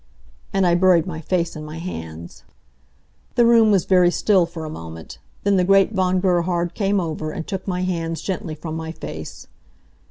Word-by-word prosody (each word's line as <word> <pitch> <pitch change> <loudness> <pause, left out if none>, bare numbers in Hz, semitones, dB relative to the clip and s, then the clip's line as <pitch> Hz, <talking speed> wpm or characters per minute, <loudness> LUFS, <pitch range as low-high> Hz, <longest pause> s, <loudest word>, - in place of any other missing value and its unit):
And 195 -1 +2
I 175 - +4
buried 175 -2 +4
my 165 -4 -5
face 170 0 -1
in 155 - -7
my 155 +1 -8
hands. 85 - -8 0.9
The 240 - +5
room 230 -2 +6
was 195 -4 +3
very 180 -2 +5
still 185 -1 +2
for 165 -2 -7
a - - -5
moment. 80 - -9 0.2
Then 200 -1 +3
the 180 - +3
great 195 +2 +4
Von 185 -1 +1
Gerhard 175 -1 0
came 200 -1 +1
over, 160 -3 -3
and 160 +1 -5
took 190 -2 -5
my 180 -1 -1
hands 165 -3 -2
gently 190 -4 -4
from 160 +1 -6
my 160 0 -5
face. 80 - -8
175 Hz, 185 wpm, -21 LUFS, 160-190 Hz, 0.9 s, room